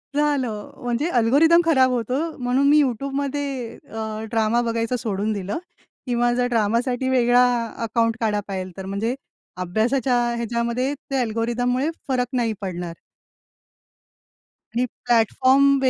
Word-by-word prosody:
झालं 265 -8 0
म्हणजे 245 +7 0
अल्गोरिदम 315 +9 +5
खराब 265 -6 +4
होतो 245 0 -1 0.2
म्हणून 255 +2 +1
मी 300 - +6
YouTube 270 +2 -2
मध्ये 275 -4 -3
अ, 220 0 -4
ड्रामा 225 +1 +2
बघायचं 230 +1 -1
सोडून 215 0 -1
दिलं. 200 - -3 0.5
किंवा 240 0 +2
जर 245 0 +1
ड्रामासाठी 240 +3 +1
वेगळा 245 -1 +4 0.4
अकाउंट 230 0 +1
काढा 210 -2 +1
पाहिजे 185 -2 -4
तर. 190 - -6
म्हणजे 205 +5 -2 0.5
अभ्यासाच्या 240 +8 +1 0.2
ह्याच्यामध्ये 235 +3 -1
त्या 275 -2 -3
अल्गोरिथममुळे 245 +4 0 0.2
फरक 250 -2 0
नाही 230 -3 +1
पडणार. 175 -3 -4 1.8
आणि 245 +1 +2 0.2
प्लॅटफॉर्म्स 260 +4 +4
240 Hz, 120 wpm, -23 LUFS, 220-260 Hz, 1.8 s, मी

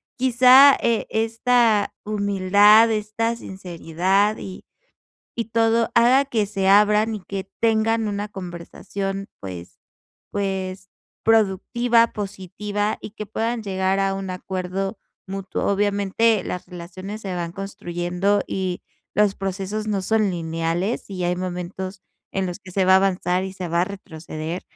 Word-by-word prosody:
quizá, 260 +2 +7
e 230 -2 +1
esta 225 -1 +2
humildad, 205 +1 +5
esta 220 +2 -1
sinceridad 190 +1 -1
y 190 - -8 0.7
y 230 - -2
todo 225 +1 +2
haga 250 +4 +5
que 225 -6 0
se 195 -1 -1
abran 210 +2 +4
y 210 - -5
que 195 +1 -6
tengan 225 0 +2
una 205 0 -3
conversación 195 +1 -6
pues 90 -2 -9 0.5
pues 190 -1 -3 0.3
productiva, 225 +2 +3
positiva, 205 +1 -3
y - - -8
que 215 - -6
puedan 225 +2 -2
llegar 190 -1 0
a 195 0 +1
un 195 0 -5
acuerdo 190 +2 -4 0.3
mutuo. 195 0 -4
Obviamente 205 +1 +2
las 180 - -5
relaciones 185 +4 -8
se 190 -2 -4
van 170 -1 -4
construyendo 195 0 -1
y 185 -2 -3 0.3
los 205 -1 +3
procesos 195 +2 -3
no 205 -2 0
son 215 +1 +2
lineales, 165 +4 -2
y 185 -2 -3
hay 175 0 0
momentos 185 +1 -5 0.3
en 190 -1 0
los 180 +1 -5
que 190 - -12
se 190 0 +1
va 190 - +6
a - - +9
avanzar 185 -1 +1
y 190 - -5
se 185 -2 -5
va 170 +1 +2
a - - +3
retroceder. 165 -3 -7
195 Hz, 140 wpm, -22 LUFS, 185-215 Hz, 0.7 s, a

